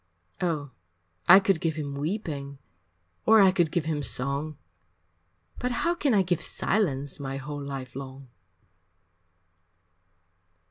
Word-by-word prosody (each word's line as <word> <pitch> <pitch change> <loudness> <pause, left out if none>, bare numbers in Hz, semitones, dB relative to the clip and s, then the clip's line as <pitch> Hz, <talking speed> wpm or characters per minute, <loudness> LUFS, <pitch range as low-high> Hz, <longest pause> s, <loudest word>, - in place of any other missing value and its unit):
Oh, 155 -6 -2 0.6
I 190 +2 +10
could 195 -4 +1
give 160 -2 -1
him 145 -3 -4
weeping, 145 -3 -4 0.7
Or 220 0 +7
I 195 -2 +7
could 175 -4 +1
give 170 -3 -1
him 155 -2 -1
song 140 +3 +1 1.0
But 250 - -1
how 335 +8 0
can 290 -8 +1
I 195 - +4
give 175 -2 -1
silence 145 -10 -1
My 135 -1 -4
whole 145 +1 -6
life 135 -3 -7
long? 135 0 -8
150 Hz, 125 wpm, -27 LUFS, 140-185 Hz, 1.0 s, I